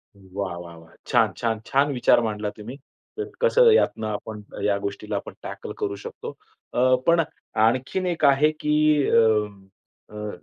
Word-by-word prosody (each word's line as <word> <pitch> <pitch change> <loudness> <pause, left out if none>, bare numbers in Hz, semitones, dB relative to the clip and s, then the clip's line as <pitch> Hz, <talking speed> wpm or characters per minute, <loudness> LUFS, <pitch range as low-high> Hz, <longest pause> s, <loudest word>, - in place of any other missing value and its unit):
वाह, 95 -1 -6
वाह, 85 -1 -10
वाह! 80 0 -17
छान, - - +3
छान. 115 -2 -1
छान 140 +2 +2
विचार 125 -2 +4
मांडला 105 -2 -2
तुम्ही. 110 +5 -8 0.7
कसं - - +5
यातनं 110 - +2
आपण, 105 0 -5 0.2
या 100 -1 +2
गोष्टीला 100 +1 -5
आपण 100 - -5
टॅकल - - -7
करू 100 - -2
शकतो. 100 - -8 0.4
अ, 130 +1 +4
पण 170 0 +5 0.4
आणखीन 130 +10 0
एक 170 -4 0
आहे 140 +2 +4
की 150 - 0 0.4
अ, - - +4 1.0
अ, 105 0 -5
110 Hz, 150 wpm, -24 LUFS, 100-140 Hz, 1.0 s, कसं